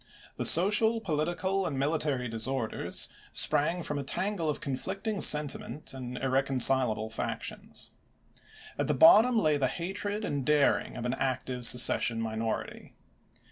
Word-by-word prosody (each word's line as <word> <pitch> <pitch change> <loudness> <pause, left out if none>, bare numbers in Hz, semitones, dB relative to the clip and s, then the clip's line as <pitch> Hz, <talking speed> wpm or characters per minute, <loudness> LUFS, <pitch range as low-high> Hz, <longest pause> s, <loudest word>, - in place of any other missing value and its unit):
The - - -2
social, 210 +6 +4
political, 185 +2 -2
and 140 - -4
military 140 -3 -1
disorders 115 +1 -3 0.2
sprang 165 +4 +1
from 150 -2 -3
a - - -4
tangle 185 +3 -2
of 150 - -2
conflict 190 - -5
ing 215 -3 -1
sentiment 150 0 +1
and 125 -1 -7
irreconcilable 130 -4 +1
factions. 115 - -5 0.9
At - - 0
the 150 - 0
bottom 220 - +6
lay 155 -8 +2
the 135 -2 +1
hatred 205 - -4
and 140 -2 -3
daring 150 +1 +1
of 120 - -5
an 125 - -1
active 130 -2 -2
secession 120 -1 +3
minority. 110 0 -5
145 Hz, 135 wpm, -29 LUFS, 130-180 Hz, 0.9 s, bottom